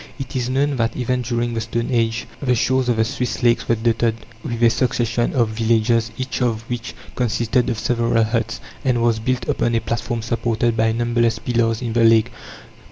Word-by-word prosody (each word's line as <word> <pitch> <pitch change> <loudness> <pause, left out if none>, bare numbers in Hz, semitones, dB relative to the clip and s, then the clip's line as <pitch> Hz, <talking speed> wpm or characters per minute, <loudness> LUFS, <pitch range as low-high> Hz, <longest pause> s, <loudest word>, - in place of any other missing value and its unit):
It 135 -1 -7
is 125 -1 -1
known 140 +1 +1
that 115 -1 0
even 125 0 0
during 120 0 -1
the 115 - -2
stone 115 +2 -2
age 115 -1 0 0.2
the 125 -3 +2
shores 130 +1 +1
of 120 - +3
the 110 0 +2
Swiss 120 +1 -3
lakes 120 -1 +2
were 115 - +4
dotted 115 0 +1 0.3
with 120 0 -3
a 115 - +7
succession 120 -1 0
of 120 -5 +2
villages, 115 +1 +1
each 130 0 -3
of 115 -2 -1
which 120 -1 -4 0.2
consisted 120 +1 0
of 120 - -1
several 115 0 +1
huts, 115 +1 -1 0.2
and 125 -3 +1
was 115 -2 +2
built 125 +3 -2
upon 120 0 0
a - - +3
platform 115 0 -3
supported 115 0 0
by 110 0 +2
numberless 120 0 +1
pillars 115 0 0
in 115 -2 -3
the 115 0 +3
lake. 115 +1 +4
115 Hz, 195 wpm, -20 LUFS, 115-125 Hz, 0.3 s, a